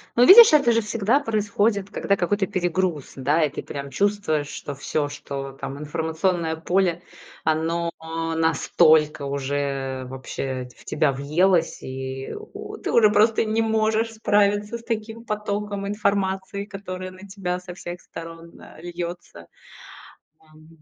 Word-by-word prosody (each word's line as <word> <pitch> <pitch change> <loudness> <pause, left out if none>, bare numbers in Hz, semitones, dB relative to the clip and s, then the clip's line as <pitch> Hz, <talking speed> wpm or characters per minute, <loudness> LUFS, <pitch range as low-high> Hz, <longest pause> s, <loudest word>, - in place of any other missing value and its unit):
Ну, 245 +1 +6
видишь, 440 -3 +10
это 280 -6 +5
же 230 0 +3
всегда 220 +5 +1
происходит, 210 -4 0
когда 200 - +1
какой-то 195 +2 0
перегруз, 175 -4 -1
да, 145 +5 +2
и 150 - +2
ты - - -5
прям 140 -1 -6
чувствуешь, 195 -4 0
что 145 -1 -6
всё, 145 +2 -1
что 140 -1 -6
там 135 - -5
информационное 160 +3 -1
поле, 175 +1 0 0.4
оно 165 +2 0 0.4
настолько 155 -1 +3
уже 140 -1 -2
вообще 130 0 -5
в - - -19
ть - - -32
тебя 150 -2 +1
въелось. 160 +6 +1
И 130 0 -5
у 435 +1 -9
ты - - -4
уже 220 -3 +6
просто 220 +2 +4
не 220 +1 +1
можешь 220 0 +1
справиться 205 0 +1
с - - -16
таким 230 0 -4
потоком 205 -2 -3
информации, 200 -1 -1
которая 185 -2 -7
на 185 +2 -13
тебя 185 -2 -3
со 180 0 -9
всех 175 -1 -7
сторон, 165 0 -10
а, - - -14
льется. 175 - -7 0.9
Ам, 155 0 -20
180 Hz, 140 wpm, -23 LUFS, 150-205 Hz, 0.9 s, видишь